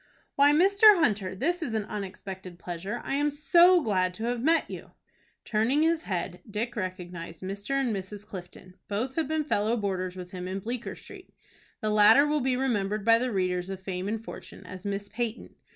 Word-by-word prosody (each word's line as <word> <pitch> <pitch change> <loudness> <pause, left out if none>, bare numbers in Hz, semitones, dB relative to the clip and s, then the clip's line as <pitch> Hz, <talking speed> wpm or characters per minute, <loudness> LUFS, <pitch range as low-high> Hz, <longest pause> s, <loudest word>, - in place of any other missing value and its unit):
"Why, 285 +1 +6
Mr. 395 +6 +6
Hunter, 205 - +1
this 345 - -1
is 240 -9 -3
an 215 -2 -1
unexpected 190 -3 -7
pleasure. 185 +7 -5
I - - -2
am 295 +1 +2
so 340 +4 +5
glad 185 -4 0
to 220 - -6
have 240 0 -1
met 325 +5 +3
you." - - -9 0.5
Turning 235 +8 +2
his 325 0 +2
head, 180 - -4
Dick 220 +4 -3
recognized 180 -4 -6
Mr. 200 +7 -4
and 245 -5 0
Mrs. 200 +2 -7
Clifton. 185 -2 -10
Both 225 +6 -2
had 325 0 -1
been 310 0 0
fellow 225 -4 0
boarders 185 -3 -2
with 180 -1 -8
him 180 -1 -6
in 190 +1 -3
Bleecker 235 +4 -5
Street. - - -12 0.5
The 215 - 0
latter 210 +7 +7
will 295 0 +1
be 255 0 +1
remembered 210 -5 -1
by 230 0 +6
the 250 +1 -1
readers 180 -2 -1
of 195 -1 -5
"Fame 190 0 -4
and 220 +1 -3
Fortune" 195 - -10
as 185 +2 -8
Miss 200 0 -3
Peyton. 230 +1 -4
210 Hz, 190 wpm, -28 LUFS, 185-265 Hz, 0.5 s, latter